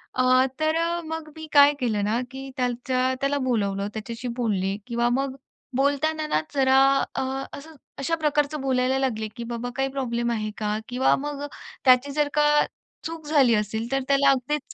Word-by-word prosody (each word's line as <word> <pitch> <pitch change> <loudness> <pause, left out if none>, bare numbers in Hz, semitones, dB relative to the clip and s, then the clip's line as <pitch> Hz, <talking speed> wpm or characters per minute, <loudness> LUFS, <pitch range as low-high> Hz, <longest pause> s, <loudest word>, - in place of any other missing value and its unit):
अ, 255 0 +4
तर 310 0 +1
अ, 340 +1 0
मग 320 -1 -5
मी 315 0 -8
काय 285 0 +7
केलं 220 -5 0
ना, 225 +3 +1
की 270 0 -7
त्याच्या 255 +1 0
त्याला 280 +1 +1
बोलावलं, 200 -3 0
त्याच्याशी 230 +3 -6
बोलले 200 -4 0
किंवा 235 0 +1
मग 265 +1 -1 0.4
बोलताना 305 +3 +1
ना, 155 - +1
जरा 265 -1 +4 0.4
अ, - - 0 0.4
असं 315 +3 -12 0.2
अशा 330 +5 0
प्रकारचं 300 -2 0
बोलायला 260 0 +1
लागले, 220 -5 -1
की 235 - -4
बाबा 235 +1 -4
काही 270 0 0
प्रॉब्लेम 240 -3 -2
आहे 215 -2 -2
का? 210 -1 -1
किंवा 250 +2 +3
मग 290 0 -4 0.4
त्याची 255 +2 +5
जर 295 0 +1
का 295 0 +3 0.6
चूक 325 -1 -6
झाली 275 -6 +4
असेल 220 +3 -2
तर 270 0 +1
त्याला 275 0 +4
अगदीच 270 +2 -2
265 Hz, 170 wpm, -25 LUFS, 235-285 Hz, 0.6 s, काय